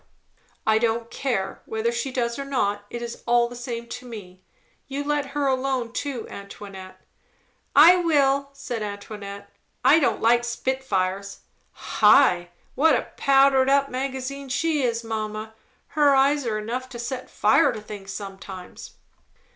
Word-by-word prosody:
"I 220 Hz, 0 st, +4 dB
don't 230 Hz, 0 st, -1 dB
care, 220 Hz, -8 st, -2 dB
whether 220 Hz, +1 st, -1 dB
she 260 Hz, +3 st, -3 dB
does 235 Hz, -1 st, -2 dB
or -, -, -2 dB
not. 205 Hz, -7 st, -1 dB
It 240 Hz, 0 st, -5 dB
is 235 Hz, 0 st, -7 dB
all 240 Hz, 0 st, +4 dB
the 245 Hz, -, -10 dB
same 240 Hz, -1 st, -5 dB
to 250 Hz, +1 st, -7 dB
me. 185 Hz, -6 st, -10 dB, 0.5 s
You 280 Hz, +1 st, -3 dB
let 290 Hz, -1 st, -1 dB
her 290 Hz, -, +1 dB
alone 260 Hz, -3 st, 0 dB
too, 265 Hz, -3 st, -4 dB
Antoinette." 195 Hz, -1 st, -10 dB, 0.8 s
"I 330 Hz, +6 st, +9 dB
will," 280 Hz, -5 st, +2 dB
said 250 Hz, -4 st, -5 dB
Antoinette. 200 Hz, -1 st, -7 dB, 0.3 s
"I 320 Hz, -, +7 dB
don't 290 Hz, -, +1 dB
like 235 Hz, +1 st, +4 dB
spitfires. 200 Hz, -6 st, -2 dB, 0.3 s
High! 180 Hz, -11 st, +4 dB, 0.2 s
what 310 Hz, +2 st, +4 dB
a -, -, -3 dB
powder 270 Hz, -1 st, +5 dB, 0.3 s
magazine 265 Hz, +1 st, -4 dB
she 310 Hz, +3 st, 0 dB
is, 235 Hz, -2 st, 0 dB
mamma! 215 Hz, -1 st, -4 dB, 0.4 s
Her 290 Hz, -3 st, +4 dB
eyes 275 Hz, 0 st, +3 dB
are 215 Hz, -2 st, 0 dB
enough 245 Hz, +4 st, -4 dB
to 245 Hz, -, -8 dB
set 250 Hz, +2 st, -5 dB
fire 215 Hz, +6 st, +3 dB
to 225 Hz, -, -6 dB
things 205 Hz, -2 st, -9 dB
sometimes." 195 Hz, -2 st, -9 dB
240 Hz, 145 wpm, -24 LUFS, 215-275 Hz, 0.8 s, I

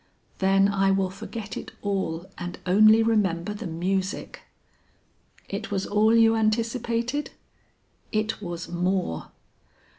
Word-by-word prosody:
"Then 195 Hz, 0 st, +4 dB
I 195 Hz, -1 st, +2 dB
will 195 Hz, -1 st, +1 dB
forget 205 Hz, +2 st, -7 dB
it -, -, -7 dB
all 190 Hz, -4 st, -2 dB
and 175 Hz, 0 st, -6 dB
only 215 Hz, +4 st, +6 dB
remember 205 Hz, -4 st, +1 dB
the 210 Hz, -1 st, -6 dB
music." 185 Hz, +4 st, -2 dB, 1.1 s
"It 200 Hz, +3 st, -5 dB
was 195 Hz, -1 st, -1 dB
all 215 Hz, +2 st, +3 dB
you 225 Hz, 0 st, +5 dB
anticipated?" 230 Hz, +4 st, 0 dB, 0.8 s
"It 215 Hz, 0 st, -1 dB
was 175 Hz, -3 st, -5 dB
more." 180 Hz, -, -1 dB
200 Hz, 115 wpm, -25 LUFS, 185-220 Hz, 1.1 s, only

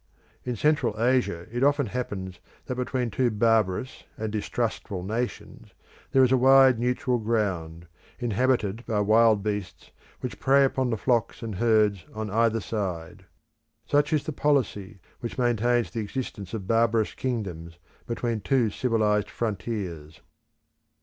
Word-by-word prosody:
In 125 Hz, -1 st, -3 dB
Central 135 Hz, -4 st, +1 dB
Africa 120 Hz, -8 st, +1 dB
it 120 Hz, +2 st, -1 dB
often 145 Hz, 0 st, +3 dB
happens 100 Hz, -6 st, -5 dB, 0.3 s
that -, -, -3 dB
between 125 Hz, -1 st, -2 dB
two 125 Hz, +2 st, +1 dB
barbarous 110 Hz, +1 st, 0 dB
and 110 Hz, -1 st, -3 dB
distrustful 105 Hz, -3 st, -3 dB
nations 115 Hz, +5 st, -5 dB, 0.4 s
there 135 Hz, -, +5 dB
is 130 Hz, -, +3 dB
a 130 Hz, -, +5 dB
wide 130 Hz, -1 st, +6 dB
neutral 125 Hz, +1 st, 0 dB
ground, 95 Hz, -7 st, -2 dB, 0.3 s
inhabited 120 Hz, -2 st, 0 dB
by 110 Hz, -3 st, 0 dB
wild 110 Hz, 0 st, +4 dB
beasts, 105 Hz, -3 st, -4 dB, 0.3 s
which 125 Hz, -, -5 dB
prey 140 Hz, +1 st, +4 dB
upon 130 Hz, -1 st, 0 dB
the 115 Hz, -, -1 dB
flocks 120 Hz, 0 st, 0 dB
and 110 Hz, -2 st, -4 dB
herds 105 Hz, -2 st, +2 dB
on 110 Hz, -2 st, -4 dB
either 115 Hz, +1 st, +2 dB
side. 95 Hz, -3 st, -4 dB, 0.6 s
Such 145 Hz, +2 st, +2 dB
is 155 Hz, -2 st, +1 dB
the 155 Hz, -, -4 dB
policy 115 Hz, -9 st, 0 dB, 0.2 s
which 120 Hz, -, -6 dB
maintains 120 Hz, -1 st, +1 dB
the 115 Hz, -, -4 dB
existence 105 Hz, -3 st, -5 dB
of 100 Hz, -4 st, -5 dB
barbarous 115 Hz, 0 st, +2 dB
kingdoms 90 Hz, -10 st, -4 dB, 0.3 s
between 115 Hz, -2 st, -2 dB
two 120 Hz, -1 st, +1 dB
civilised 105 Hz, -3 st, +1 dB
frontiers. 95 Hz, -8 st, -4 dB
115 Hz, 135 wpm, -26 LUFS, 100-125 Hz, 0.6 s, wide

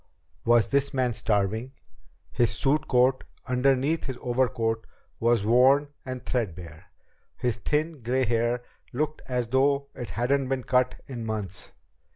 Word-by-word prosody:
Was 120 Hz, -3 st, +4 dB
this 140 Hz, 0 st, +1 dB
man 125 Hz, -2 st, +1 dB
starving? 110 Hz, +4 st, 0 dB, 0.6 s
His 120 Hz, -2 st, +2 dB
suit 145 Hz, +2 st, +1 dB
coat, 130 Hz, 0 st, +3 dB, 0.2 s
underneath 135 Hz, +4 st, +1 dB
his 130 Hz, -2 st, -4 dB
overcoat, 120 Hz, -3 st, 0 dB, 0.3 s
was 115 Hz, -3 st, +2 dB
worn 130 Hz, +5 st, +5 dB
and 130 Hz, -1 st, -6 dB
threadbare. 90 Hz, -7 st, -4 dB, 0.5 s
His 120 Hz, -3 st, -1 dB
thin, 150 Hz, +6 st, -1 dB
gray 125 Hz, +3 st, +1 dB
hair 120 Hz, +1 st, 0 dB, 0.3 s
looked 150 Hz, +4 st, -2 dB
as 125 Hz, -3 st, -1 dB
though 140 Hz, +2 st, +2 dB
it 120 Hz, -, -7 dB
hadn't 130 Hz, +4 st, 0 dB
been 135 Hz, -1 st, -1 dB
cut 125 Hz, 0 st, +2 dB
in 120 Hz, -4 st, -6 dB
months. 105 Hz, -5 st, -4 dB
125 Hz, 135 wpm, -26 LUFS, 115-135 Hz, 0.6 s, worn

